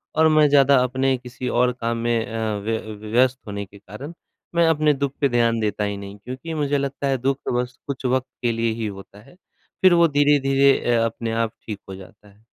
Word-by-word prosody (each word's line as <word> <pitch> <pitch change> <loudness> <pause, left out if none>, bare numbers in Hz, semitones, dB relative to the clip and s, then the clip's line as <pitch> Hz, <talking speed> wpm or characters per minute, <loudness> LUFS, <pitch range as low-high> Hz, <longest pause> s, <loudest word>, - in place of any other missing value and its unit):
और 160 0 +5
मैं 155 -1 +5
ज़्यादा 140 -1 +5
अपने 130 +1 0
किसी 125 +1 -7
और 125 +1 +2
काम 115 0 -1
में 115 -1 0
अ, 110 -2 -3
व्य 110 +2 -2 0.3
व्यस्त 125 +3 +2
होने 100 0 -5
के 100 +2 -17
कारण, 110 - -9 0.4
मैं 170 0 +4
अपने 155 -2 +3
दुःख 140 -1 -2
पे 140 - +4
ध्यान 115 -2 +2
देता 105 -1 -1
ही 100 0 -2
नहीं। 100 0 -9
क्योंकि 130 +9 -7
मुझे 145 -2 0
लगता 140 0 -3
है 135 -1 +1
दुःख 135 +2 0
तो - - -1
बस 125 +1 -4
कुछ 135 -1 -5
वक़्त 130 0 +1
के 120 - +1
लिए 115 0 0
ही - - -1
होता 100 0 -10
है, 115 - -19 0.5
फिर 185 -1 +6
वो 170 -1 +5
धीरे-धीरे 140 -2 +3 0.2
अ, 115 0 +2
अपने 115 -1 -3
आप 115 -1 -1
ठीक 105 -3 -6
हो 95 - -6
जाता 100 +3 -15
है। 105 +2 -24
125 Hz, 220 wpm, -22 LUFS, 110-140 Hz, 0.5 s, फिर